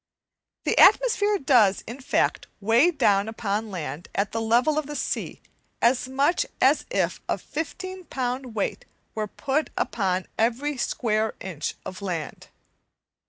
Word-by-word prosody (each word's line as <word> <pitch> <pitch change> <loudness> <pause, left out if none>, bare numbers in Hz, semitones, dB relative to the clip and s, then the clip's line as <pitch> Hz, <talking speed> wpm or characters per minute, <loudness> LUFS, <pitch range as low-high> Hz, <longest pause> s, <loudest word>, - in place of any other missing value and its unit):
The - - +1
atmosphere 425 -3 +5
does, 240 - +4
in 240 +5 -8
fact, 260 - 0
weigh 230 - +4
down 205 - +2
upon 220 -1 -2
land 170 -3 -6
at 200 0 0
the 225 - -2
level 245 +7 +3
of 300 - -5
the 295 - -6
sea - - -3 0.4
as 250 +1 +2
much 280 +6 +2 0.2
as - - +4
if - - 0
a - - +1
15 370 +4 -6
pound 255 -3 -3
weight 205 - -2 0.3
were 215 -1 -2
put 275 +8 -1
upon 190 -4 0
every 245 +6 +1
square 220 -3 0
inch 180 -6 -4
of 185 - -7
land. 175 -6 -5
235 Hz, 140 wpm, -25 LUFS, 205-290 Hz, 0.4 s, atmosphere